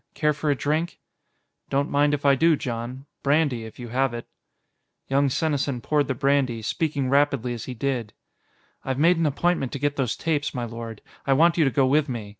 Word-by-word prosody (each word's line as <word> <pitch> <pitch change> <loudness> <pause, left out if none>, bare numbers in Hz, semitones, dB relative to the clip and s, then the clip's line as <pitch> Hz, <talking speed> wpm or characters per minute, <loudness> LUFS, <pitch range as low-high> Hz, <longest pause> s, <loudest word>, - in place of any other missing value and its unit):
Care 150 -1 +2
for 150 +1 -2
a 145 - +3
drink?" 155 +5 -1 0.7
"Don't 140 +1 0
mind 145 +1 +3
if 145 - -7
I 140 - +6
do, 160 +4 +4
Jon. 125 +1 -5 0.2
Brandy, 140 -5 +1
if 110 - -11
you 120 -2 -8
have 130 0 0
it." 120 - -7 0.8
Young 140 +1 +2
Senesin 140 -2 -1
poured 145 +4 0
the 130 - -1
brandy, 135 -4 +1
speaking 140 +2 -1
rapidly 140 -3 +2
as 120 - -6
he 130 - -6
did. 120 -3 -2 0.7
"I've 130 -1 -2
made 170 +4 +4
an 165 -1 +2
appointment 150 -2 0
to - - -2
get 145 +1 -1
those 125 -4 0
tapes, 150 -3 -1
my 120 -1 -2
lord. 115 -1 -8 0.2
I 135 - +4
want 165 +5 +4
you 160 - +5
to - - +3
go 135 +2 +2
with 145 +2 +2
me. 115 -5 -5
140 Hz, 205 wpm, -24 LUFS, 125-150 Hz, 0.8 s, I